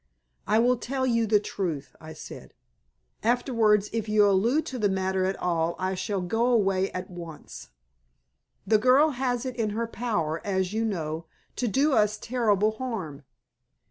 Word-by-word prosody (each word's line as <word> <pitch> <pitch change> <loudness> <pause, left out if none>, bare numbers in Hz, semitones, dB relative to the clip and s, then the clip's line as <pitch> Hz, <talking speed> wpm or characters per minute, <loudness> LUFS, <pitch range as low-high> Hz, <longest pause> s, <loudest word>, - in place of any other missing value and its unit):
"I 215 - +3
will 245 +2 +3
tell 260 +2 -2
you 230 -3 +1
the 210 0 +4
truth," 160 -10 -4
I 160 0 -9
said. 155 - -11 0.7
"Afterwards, 225 -3 +2
if 225 -2 -2
you 210 -1 +5
allude 230 +10 +2
to 255 - -5
the 205 -2 +2
matter 190 0 0
at 190 +1 0
all 170 -1 0
I 185 +1 -1
shall 190 +1 -2
go 225 +7 0
away 195 -5 +2
at 185 0 -6
once. 170 -3 -10 1.0
The 215 -1 +4
girl 265 +7 +5
has 250 -1 -2
it 255 -2 -4
in 225 -3 -1
her 230 - 0
power, 210 -10 -2
as 190 -1 -1
you 225 +1 0
know, 165 -5 -3 0.3
to 245 - -1
do 275 +6 +2
us 210 -2 +2
terrible 215 -4 +1
harm. 185 - -5
210 Hz, 165 wpm, -26 LUFS, 185-240 Hz, 1.0 s, you